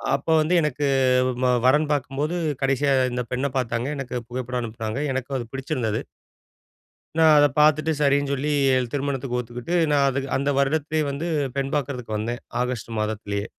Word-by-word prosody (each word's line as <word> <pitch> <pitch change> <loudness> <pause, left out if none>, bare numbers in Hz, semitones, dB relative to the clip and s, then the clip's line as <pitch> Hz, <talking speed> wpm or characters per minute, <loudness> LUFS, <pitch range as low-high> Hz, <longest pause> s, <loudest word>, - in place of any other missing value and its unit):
அப்ப 140 - -6
வந்து 155 +4 0
எனக்கு, 150 -1 -1 0.6
ம 125 - +4
வரன் 150 +3 +4
பாக்கும்போது, 145 +4 -2 0.3
கடைசியா 135 +1 +2 0.2
இந்த 125 0 -2
பெண்ண 130 +3 0
பாத்தாங்க.எனக்கு 125 +2 -2
புகைப்படம் 125 0 -3
அனுப்புனாங்க. 110 +1 -4
எனக்கும் 130 +1 -3
அது 120 - -4
பிடிச்சிருந்தது. 130 -6 -2 1.2
நான் 160 -1 +7
அத 145 - +7
பாத்துட்டு, 155 +1 +4
சரின்னு 140 0 +2
சொல்லி, 145 +2 -1 0.2
எ - - +4 0.2
திருமணத்துக்கு 135 -3 -2
ஒத்துக்கிட்டு, 125 +7 -4 0.2
நான் 140 -1 +4
அது 135 - -1 0.2
அந்த 140 +1 -1
வருடத்திலே 155 +2 +1
வந்து, 145 +5 -4 0.3
பெண் 135 +1 -2
பாக்குறதுக்கு 125 -6 -3
வந்தேன். 120 +3 -3 0.2
ஆகஸ்ட் 125 -3 -3
மாதத்திலயே. 105 -1 -2
135 Hz, 145 wpm, -24 LUFS, 125-145 Hz, 1.2 s, நான்